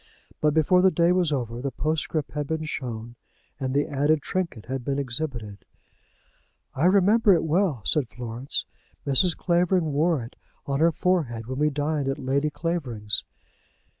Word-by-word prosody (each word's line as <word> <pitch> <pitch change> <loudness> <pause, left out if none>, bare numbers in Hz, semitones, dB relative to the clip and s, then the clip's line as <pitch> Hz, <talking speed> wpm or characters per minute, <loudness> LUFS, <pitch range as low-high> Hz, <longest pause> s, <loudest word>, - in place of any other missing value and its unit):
But 150 0 +2
before 170 +4 +4
the 190 - +6
day 170 0 +3
was 180 -3 +2
over 120 -4 -2
the 140 - -1
postscript 155 +2 -2
had 150 -1 -3
been 160 +1 -2
shown, 120 -6 -5 0.4
and 130 -2 -2
the 145 +2 +2
added 145 +2 +1
trinket 170 - -3
had 130 0 -4
been 140 +2 -1
exhibited. 125 -6 -4 1.1
"I 145 - 0
remember 200 +2 +5
it 165 - 0
well," 160 - +1
said 140 -6 +1
Florence. 120 +3 -4 0.4
"Mrs. 145 +6 +3
Clavering 175 -3 +1
wore 155 -2 +2
it 115 - -11 0.3
on 140 0 -1
her 165 +2 +5
forehead 150 -10 0
when 130 +3 -5
we 150 0 +3
dined 145 0 -1
at 135 - -1
Lady 140 +3 0
Clavering's." 130 -11 -2
145 Hz, 160 wpm, -25 LUFS, 130-165 Hz, 1.1 s, the